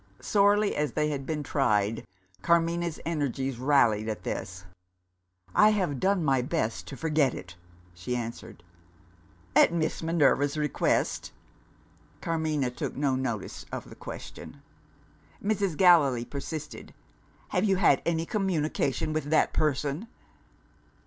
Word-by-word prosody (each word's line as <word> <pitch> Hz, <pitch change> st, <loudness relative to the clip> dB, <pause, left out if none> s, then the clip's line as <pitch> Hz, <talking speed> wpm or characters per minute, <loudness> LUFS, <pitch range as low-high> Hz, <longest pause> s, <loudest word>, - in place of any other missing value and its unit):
Sorely 205 Hz, 0 st, +3 dB
as 150 Hz, 0 st, -1 dB
they 150 Hz, 0 st, +1 dB
had 140 Hz, -2 st, -4 dB
been 155 Hz, -2 st, -2 dB
tried, 105 Hz, -, 0 dB, 0.3 s
Carmina's 170 Hz, +3 st, +1 dB
energies 135 Hz, -5 st, -2 dB
rallied 115 Hz, -6 st, +3 dB
at 110 Hz, -, -5 dB
this. 90 Hz, 0 st, -5 dB, 0.9 s
"I 210 Hz, -, +6 dB
have 185 Hz, -11 st, 0 dB
done 190 Hz, -3 st, +1 dB
my 135 Hz, -2 st, +3 dB
best 115 Hz, -2 st, -2 dB
to 135 Hz, -, -8 dB
forget 155 Hz, -5 st, +1 dB
it!" 90 Hz, 0 st, -9 dB, 0.4 s
she 90 Hz, +9 st, -4 dB
answered. 115 Hz, -7 st, -6 dB, 0.9 s
"At -, -, +6 dB
Miss 165 Hz, -2 st, -1 dB
Minerva's 145 Hz, -3 st, +2 dB
request?" 150 Hz, -2 st, 0 dB, 0.9 s
Carmina 155 Hz, -5 st, -1 dB
took 125 Hz, -, -5 dB
no 140 Hz, -1 st, +1 dB
notice 120 Hz, -6 st, -4 dB
of -, -, -6 dB
the -, -, -10 dB
question. -, -, -9 dB, 0.8 s
Mrs. 200 Hz, -5 st, -1 dB
Gallilee 145 Hz, -10 st, +5 dB
persisted. 150 Hz, +3 st, -7 dB, 0.5 s
"Have 180 Hz, -, +1 dB
you 195 Hz, -2 st, +3 dB
had 180 Hz, -7 st, +4 dB
any 165 Hz, -1 st, 0 dB
communication 160 Hz, -, -1 dB
with 155 Hz, -2 st, -2 dB
that 155 Hz, +2 st, +2 dB
person?" 150 Hz, -, -1 dB
150 Hz, 120 wpm, -28 LUFS, 130-170 Hz, 0.9 s, I